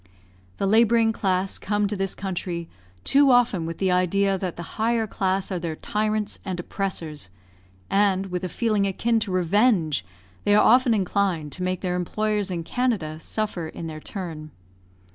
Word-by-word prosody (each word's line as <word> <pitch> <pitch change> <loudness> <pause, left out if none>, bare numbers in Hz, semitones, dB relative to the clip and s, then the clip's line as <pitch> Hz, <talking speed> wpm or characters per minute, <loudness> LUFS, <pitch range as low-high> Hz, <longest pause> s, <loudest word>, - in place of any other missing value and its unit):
The - - -1
labouring 225 +2 +4
class 190 -2 -1
come 205 0 0
to 210 - -3
this 195 -1 -2
country, 175 -3 -4 0.4
too 280 0 +5
often 235 -9 +3
with 165 0 -5
the 190 -1 +1
idea 195 +2 +2
that 185 -2 -3
the 170 +5 -9
higher 230 0 +2
class 190 -1 -1
are 185 - -1
their 165 -2 -3
tyrants 215 +3 -2
and 185 -2 -4
oppressors; 165 - -4 0.6
and, 195 -1 +2
with 180 0 -3
a 185 - -2
feeling 215 -1 +1
akin 225 +4 +1
to 205 - -3
revenge, 185 - +2 0.4
they 205 - +4
are - - +5
often 245 0 +5
inclined 185 -6 0
to 185 - -8
make 185 0 -1
their 180 -2 -1
employers 210 +3 -1
in 170 -2 -3
Canada 185 -9 -1
suffer 190 -3 -3
in 165 - -7
their 155 -1 -6
turn. 160 -4 -6
195 Hz, 165 wpm, -24 LUFS, 175-215 Hz, 0.6 s, too